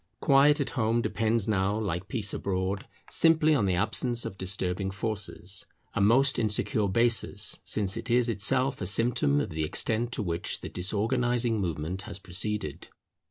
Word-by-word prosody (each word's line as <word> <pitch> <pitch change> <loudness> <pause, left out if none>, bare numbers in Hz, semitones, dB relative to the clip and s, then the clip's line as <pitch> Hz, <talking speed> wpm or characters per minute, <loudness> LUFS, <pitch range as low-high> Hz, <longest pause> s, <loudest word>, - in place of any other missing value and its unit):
Quiet 140 +2 +4
at - - -1
home 115 -2 0
depends 110 -1 0
now, 100 -1 0
like 95 -4 -3
peace 105 -4 -4
abroad, 95 0 -3 0.2
simply 160 -1 +4
on 110 -9 +2
the 90 - +1
absence 115 +5 -1
of - - -5
disturbing 95 0 -2
forces; 100 -2 -2 0.3
a - - -1
most 130 +6 +4
insecure 105 -1 0
basis, 115 +3 +2
since 100 -1 0
it 115 +1 -6
is 120 0 +3
itself 125 +5 +1
a 90 - -1
symptom 105 - +2
of - - -3
the 80 0 -2
extent 115 +9 -1
to 110 - -2
which 85 -3 -3
the - - -6
disorganizing 115 +4 0
movement 85 +1 -3
has - - -5
proceeded. 100 -3 -1
105 Hz, 160 wpm, -28 LUFS, 95-120 Hz, 0.3 s, Quiet